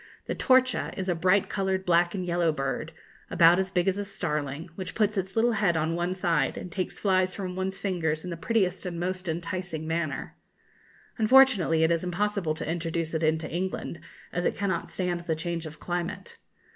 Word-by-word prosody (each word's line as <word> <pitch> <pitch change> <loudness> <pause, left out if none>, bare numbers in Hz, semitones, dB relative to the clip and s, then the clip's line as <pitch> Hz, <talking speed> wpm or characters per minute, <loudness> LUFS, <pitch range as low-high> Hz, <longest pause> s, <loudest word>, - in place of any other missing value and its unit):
The - - -2
torcha 255 0 +2
is 190 0 -2
a - - +3
bright 185 +4 +3
coloured 190 -1 -1
black 175 +1 +3
and 185 -2 -3
yellow 170 -1 +2
bird, 135 +2 -3 0.4
about 170 +2 +6
as 190 0 0
big 180 -1 0
as 195 +1 +1
a - - -1
starling, 150 -5 -3
which 185 +2 -6
puts 215 -1 +2
its 190 -1 -3
little 230 +2 +3
head 200 -7 +2
on 160 +1 0
one 175 +2 -1
side 165 -7 +1
and 180 - -7
takes 185 +1 -3
flies 185 -2 +2
from 185 -2 -4
one's 190 +1 -2
fingers 160 -5 -1
in 180 - -5
the - - -3
prettiest 190 0 0
and 170 -1 -4
most 185 0 -3
enticing 170 -1 -3
manner. 160 -3 -2 0.8
Unfortunately, 215 -9 +5
it 160 - +3
is 165 0 +1
impossible 180 -2 -1
to 160 - -5
introduce 165 0 -2
it 160 - 0
into 160 0 +1
England, 175 0 -3 0.3
as 175 - -1
it - - +1
cannot 190 -4 -1
stand 180 -2 -2
the 170 -2 -2
change 170 0 -3
of 155 0 -11
climate. 175 -1 -4
175 Hz, 195 wpm, -27 LUFS, 165-190 Hz, 0.8 s, about